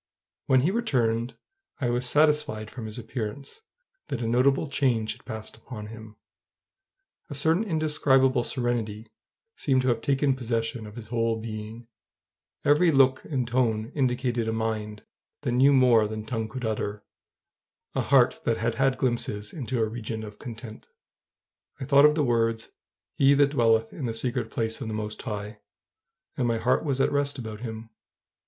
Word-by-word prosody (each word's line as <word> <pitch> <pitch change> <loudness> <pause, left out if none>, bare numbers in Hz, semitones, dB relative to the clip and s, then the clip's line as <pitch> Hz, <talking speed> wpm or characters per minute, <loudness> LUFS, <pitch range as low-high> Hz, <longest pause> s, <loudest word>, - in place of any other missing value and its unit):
When 130 -1 +5
he 165 +8 +2
returned 125 - 0 0.4
I 120 -3 0
was 125 +1 -1
satisfied 150 -8 +2
from 115 -3 -7
his 110 - -8
appearance 125 - -6 0.5
that 120 - -3
a - - -1
notable 130 +5 +3
change 130 -6 +1
had - - -11
passed 110 0 -6
upon 110 -1 -9
him: 110 -1 -11 1.1
a 145 - -6
certain 160 +8 +2
indescribable 145 - +2
serenity 115 -4 -2 0.5
seemed 130 -2 +1
to 130 - +2
have 115 -1 +1
taken 135 +1 +2
possession 115 -2 -2
of 105 - -11
his 115 -2 -9
whole 115 -1 0
being; 110 +1 -7 0.8
every 150 +4 +5
look 135 -2 +4
and 130 -5 -2
tone 115 -3 0
indicated 125 -4 0
a - - +1
mind 110 -1 -3 0.4
that - - -1
knew 130 +3 +5
more 125 -5 +5
than 110 0 -5
tongue 110 -1 -2
could 125 +2 -6
utter, 105 -1 -3 0.9
a - - 0
heart - - +3
that 115 - +1
had 115 +1 0
had 135 -1 +3
glimpses 110 -4 -2
into 130 -4 -3
a 110 - +3
region 110 0 -5
of 105 -1 -10
content. 115 -3 -9 0.9
I - - -4
thought 140 +1 +6
of 150 0 +5
the 155 - +2
words, 115 -2 0 0.4
"He 140 +1 +5
that 140 0 +4
dwelleth 115 -4 +2
in 145 - -5
the 115 -1 -2
secret 120 -1 -2
place 110 0 -2
of - - -4
the 110 - -3
Most 105 0 -4
High," 105 +1 -5 0.8
and 125 -3 +1
my 115 -1 +1
heart 125 +3 +1
was 140 -4 -1
at - - +2
rest 145 0 0
about 110 -4 -6
him. 110 -1 -7
120 Hz, 165 wpm, -26 LUFS, 110-135 Hz, 1.1 s, thought